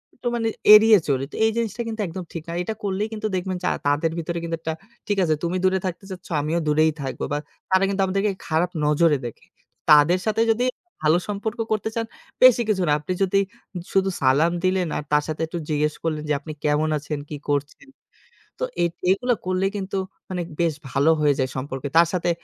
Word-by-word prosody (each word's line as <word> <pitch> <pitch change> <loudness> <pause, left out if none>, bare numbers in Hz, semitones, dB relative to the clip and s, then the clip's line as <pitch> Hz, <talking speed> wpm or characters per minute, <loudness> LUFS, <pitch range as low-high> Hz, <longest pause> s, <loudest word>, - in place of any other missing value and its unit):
একটু 245 - -6
মানে 230 -1 0 0.3
এড়িয়ে 215 0 +8
চলি। 135 -2 +1
তো - - -9
এই 220 - +3
জিনিসটা 235 +1 -2
কিন্তু 220 -1 -4
একদম 180 +2 -6
ঠিক 165 -2 -5
না। - - -4
এটা 220 - -3
করলেই 200 +1 -1
কিন্তু 215 0 -2
দেখবেন 185 0 -2
যে - - +1 0.2
তাদের 150 +3 +1
ভিতরে 170 +1 -3
কিন্তু 165 0 -2
একটা, 160 0 -3 0.3
ঠিক 205 - 0
আছে, 160 -3 +2
তুমি 170 +2 0
দূরে 190 0 +3
থাকতে 185 +1 -4
চাচ্ছ, 185 -1 -9
আমিও 160 +3 0
দূরেই 155 +1 +4
থাকবো। 135 -1 -4
বা - - +1 0.3
তারা 190 0 +4
কিন্তু 195 0 0
আমাদেরকে 195 +2 0 0.2
খারাপ 165 +2 +1 0.2
নজরে 150 +1 +3
দেখে। 120 - -8 0.4
তাদের 150 +5 +6
সাথে 225 +1 +2
যদি 230 +2 0 0.4
ভালো 155 +3 +5
সম্পর্ক 215 +3 -3
করতে 215 0 0
চান, 230 0 -1 0.4
বেশি 250 -1 +8
কিছু 200 -3 +1
না। - - +3
আপনি 150 +5 -3
যদি 195 +1 +1 0.5
শুধু 195 0 +2
সালাম 140 +5 +4
দিলেন, 185 -1 +1
আর - - -4
তার 150 0 +3
সাথে 155 0 -4
একটু 170 - -5
জিজ্ঞেস 150 0 +1
করলেন 155 -2 -2
যে - - +3
"আপনি 155 +2 -8
কেমন 150 +1 +2
আছেন? 150 0 -4
কি 150 - -5
করছেন?" 145 - -2 0.7
তো - - -1 0.2
এ - - +4 0.3
এগুলা 245 +6 +2
করলে 185 +1 0
কিন্তু 195 -1 -4 0.3
মানে 180 -1 -2 0.2
বেশ 165 -2 +2 0.2
ভালো 140 +6 +3
হয়ে 145 -1 +4
যায় 130 -1 0
সম্পর্কে। 135 +1 -4
তার 170 0 +7
সাথে 175 -1 0
170 Hz, 205 wpm, -23 LUFS, 150-195 Hz, 0.7 s, এড়িয়ে